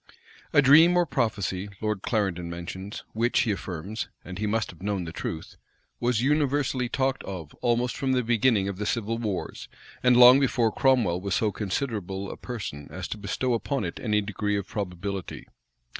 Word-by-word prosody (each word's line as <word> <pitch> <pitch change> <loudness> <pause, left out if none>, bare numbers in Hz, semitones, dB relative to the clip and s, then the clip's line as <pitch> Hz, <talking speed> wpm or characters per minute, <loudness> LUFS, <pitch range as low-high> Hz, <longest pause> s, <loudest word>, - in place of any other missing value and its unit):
A 145 - +5
dream 160 +6 +7
or 175 - +4
prophecy, 100 - -1
Lord 105 -3 -2
Clarendon 95 -7 -1
mentions, 90 +4 -6
which, 115 +2 +2
he 110 - +1
affirms, 100 +2 -4 0.2
(and 95 +1 -7
he 105 - -1
must 110 +1 0
have 85 - -18
known 100 -2 -1
the 80 - -6
truth,) 80 -1 -6 0.4
was 120 -1 +1
universally 140 -3 +1
talked 135 +1 0
of 85 -6 -7
almost 120 0 +1
from 135 -1 0
the 125 -1 +2
beginning 115 -3 +2
of 100 -2 -4
the 105 +1 -3
civil 115 0 -1
wars, 105 -5 -4 0.3
and 125 -1 +5
long 125 +2 +9
before 120 -4 +2
Cromwell 115 -11 +2
was 100 -1 -1
so 110 -2 +1
considerable 100 -3 -3
a - - -7
person 95 - -6
as - - -6
to 110 - -5
bestow 120 +5 -1
upon 135 +4 -1
it - - -5
any 105 -3 +1
degree 105 0 -2
of 100 - -3
probability. 95 -1 -5
105 Hz, 175 wpm, -26 LUFS, 95-125 Hz, 0.4 s, long